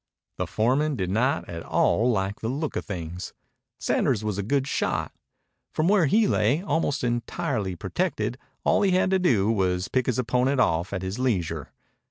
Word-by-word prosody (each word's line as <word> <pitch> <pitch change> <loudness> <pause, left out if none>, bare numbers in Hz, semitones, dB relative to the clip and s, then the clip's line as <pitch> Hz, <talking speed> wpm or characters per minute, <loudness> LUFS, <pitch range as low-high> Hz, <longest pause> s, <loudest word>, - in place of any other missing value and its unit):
The - - -1
foreman 135 +7 +1
did 95 -5 -2
not 130 +9 +1
at 85 -1 -6
all 115 +7 +2
like 100 -3 -1
the 110 - -3
look 145 +5 -2
of - - -3
things. 90 -2 -6 0.5
Sanders 105 - +1
was 105 -2 -2
a - - +1
good 135 +6 0
shot. - - -1 0.6
From 155 - +2
where 190 -5 +4
he 215 +9 +4
lay, 145 - +2
almost 145 -5 0
entirely 120 - -1
protected, 125 - -2 0.2
all - - +3
he 195 -2 +3
had 185 +1 +2
to 190 - +3
do 115 - +3
was 90 -4 +1
to - - -5
pick 130 -2 +1
his 125 - +1
opponent 125 +2 +1
off 85 -5 +2
at 95 -2 -3
his 95 +5 -4
leisure. 85 - -1
120 Hz, 185 wpm, -25 LUFS, 95-145 Hz, 0.6 s, where